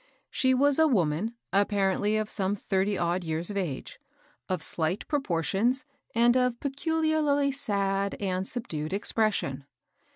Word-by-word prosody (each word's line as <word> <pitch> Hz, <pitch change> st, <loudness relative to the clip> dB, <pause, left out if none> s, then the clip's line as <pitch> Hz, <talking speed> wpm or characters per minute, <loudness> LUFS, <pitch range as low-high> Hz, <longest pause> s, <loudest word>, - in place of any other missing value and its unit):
She 260 Hz, -1 st, +2 dB
was 285 Hz, +3 st, +4 dB
a 320 Hz, -, +6 dB
woman, 195 Hz, -, 0 dB, 0.2 s
apparently 205 Hz, +1 st, +2 dB
of 215 Hz, -1 st, -1 dB
some 200 Hz, -1 st, 0 dB
thirly 195 Hz, 0 st, 0 dB
odd 175 Hz, +1 st, 0 dB
years 165 Hz, +3 st, -2 dB
of -, -, -6 dB
age, 165 Hz, -9 st, -4 dB, 0.5 s
of 185 Hz, -, -1 dB
slight 165 Hz, +5 st, -1 dB
proportions, 240 Hz, -, 0 dB, 0.3 s
and 240 Hz, +1 st, +5 dB
of 250 Hz, -2 st, +1 dB
pecu 320 Hz, +4 st, -2 dB
harly 290 Hz, -3 st, +2 dB
sad 200 Hz, -6 st, -1 dB
and 190 Hz, -1 st, -2 dB
subdued 160 Hz, -10 st, -3 dB
expression. 200 Hz, -, 0 dB
205 Hz, 135 wpm, -28 LUFS, 185-255 Hz, 0.5 s, a